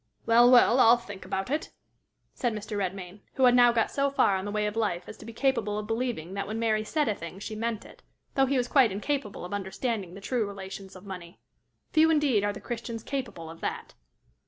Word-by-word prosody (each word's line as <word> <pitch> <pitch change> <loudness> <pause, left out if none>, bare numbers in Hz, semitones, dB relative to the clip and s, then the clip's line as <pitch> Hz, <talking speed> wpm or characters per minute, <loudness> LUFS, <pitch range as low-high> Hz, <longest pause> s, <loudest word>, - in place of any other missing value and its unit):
"Well, 235 +1 +6
well! 250 0 +6
I'll 235 0 +7
think 205 -5 -10
about 195 +6 -3
it," 305 +2 -1 0.6
said 240 -4 -1
Mr. 210 0 -5
Redmain, 190 -1 -4 0.2
who 265 - +1
had 250 -1 +7
now 245 -1 +6
got 230 -1 +1
so 280 0 +1
far 240 -7 +3
on 190 +1 -3
the 205 - -3
way 210 0 0
of 210 +1 -2
life 205 -6 -1
as - - -9
to - - -12
be - - -6
capable 230 -4 0
of 210 - -3
believing 225 -6 -3
that 200 0 -3
when 215 +2 -4
Mary 220 -2 +1
said 300 +6 0
a 215 - +2
thing 170 -1 -8
she 210 +2 -6
meant 225 0 -3
it, - - -15 0.3
though 270 -2 +3
he 275 +1 +1
was 245 -1 0
quite 255 -5 +4
incapable 210 -1 -3
of 180 - -7
understanding 200 -1 -3
the - - -8
true 225 +1 -1
relations 195 -1 -8
of 185 +2 -12
money. 180 -2 -9 0.5
Few 320 +1 +5
indeed 290 -9 +3
are 205 - +1
the 205 - -8
Christians 230 -1 -5
capable 245 - -5
of 165 +1 -11
that! - - -4
215 Hz, 230 wpm, -28 LUFS, 195-245 Hz, 0.6 s, I'll